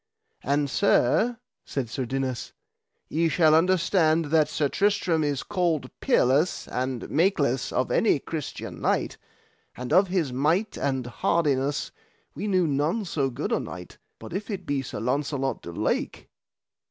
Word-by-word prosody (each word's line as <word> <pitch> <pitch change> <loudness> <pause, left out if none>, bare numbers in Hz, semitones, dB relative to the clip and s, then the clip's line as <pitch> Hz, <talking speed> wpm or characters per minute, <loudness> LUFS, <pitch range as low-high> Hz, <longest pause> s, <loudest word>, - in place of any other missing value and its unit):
And 145 +1 +1
sir, 220 - +2 0.3
said 135 -4 -3
Sir 125 +3 -3
Dinas, 130 -1 -3 0.5
ye 165 +2 +1
shall 160 -2 +4
understand 165 -1 +3
that 155 -2 +4
Sir 150 -1 0
Tristram 195 -2 +1
is 145 -2 -1
called 170 -9 -1
peerless 155 - +2
and 130 -1 -3
makeless 145 -8 +1
of - - 0
any - - +3
Christian - - -6
knight, - - 0 0.6
and 125 0 -4
of 190 +2 +5
his 175 -8 -1
might 160 - +1
and 135 -3 -1
hardiness 140 +3 0 0.4
we 210 - -4
knew 185 -3 +2
none 155 +9 0
so 140 -6 -1
good 120 - -4
a - - +2
knight, - - -8 0.2
but - - -10
if 200 +4 -4
it 190 -4 -4
be 140 -3 -1
Sir 135 - -6
Launcelot 135 +3 -1
du 85 - -8
Lake. - - -2
150 Hz, 145 wpm, -26 LUFS, 135-180 Hz, 0.6 s, of